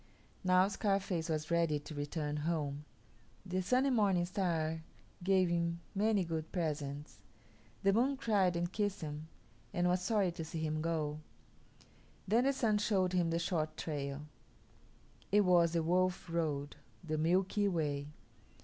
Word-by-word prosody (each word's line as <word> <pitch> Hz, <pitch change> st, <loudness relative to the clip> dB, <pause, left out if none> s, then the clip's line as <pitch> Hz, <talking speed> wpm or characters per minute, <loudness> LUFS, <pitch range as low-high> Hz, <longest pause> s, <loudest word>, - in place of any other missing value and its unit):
Now 185 Hz, 0 st, +5 dB
Scarface 195 Hz, -4 st, -1 dB
was 155 Hz, +1 st, -2 dB
ready 170 Hz, -3 st, +2 dB
to 145 Hz, +2 st, -9 dB
return 150 Hz, 0 st, -3 dB
home. 150 Hz, -2 st, -2 dB, 0.6 s
The 185 Hz, 0 st, -1 dB
Sun 255 Hz, +8 st, +2 dB
and 270 Hz, -2 st, +2 dB
Morning 195 Hz, -5 st, +3 dB
Star 165 Hz, -4 st, -1 dB, 0.4 s
gave 190 Hz, -1 st, +4 dB
him 170 Hz, 0 st, 0 dB
many 205 Hz, -1 st, +2 dB
good 160 Hz, -2 st, -4 dB
presents; 150 Hz, -4 st, -3 dB, 0.6 s
the 195 Hz, 0 st, +4 dB
Moon 260 Hz, +6 st, +2 dB
cried 200 Hz, -8 st, +2 dB
and 175 Hz, +1 st, -1 dB
kissed 205 Hz, -2 st, -1 dB
him 150 Hz, 0 st, -5 dB, 0.4 s
and 175 Hz, 0 st, +1 dB
was 180 Hz, +1 st, +2 dB
sorry 195 Hz, -1 st, +1 dB
to 170 Hz, -1 st, -6 dB
see 160 Hz, 0 st, -5 dB
him 155 Hz, 0 st, -1 dB
go. 155 Hz, -2 st, -1 dB, 1.1 s
Then 230 Hz, +6 st, +3 dB
the 275 Hz, -, +3 dB
Sun 220 Hz, -5 st, +2 dB
showed 195 Hz, -4 st, +1 dB
him 175 Hz, -2 st, +2 dB
the 165 Hz, -, 0 dB
short 160 Hz, -2 st, -1 dB
trail. 145 Hz, -1 st, -4 dB, 1.1 s
It 210 Hz, +1 st, +6 dB
was 175 Hz, -3 st, +4 dB
the 165 Hz, -1 st, +1 dB
Wolf 180 Hz, +2 st, +1 dB
Road 150 Hz, -4 st, -2 dB, 0.3 s
the 155 Hz, -2 st, -2 dB
Milky 185 Hz, +5 st, +2 dB
Way. 145 Hz, -6 st, -1 dB
170 Hz, 150 wpm, -34 LUFS, 155-195 Hz, 1.1 s, It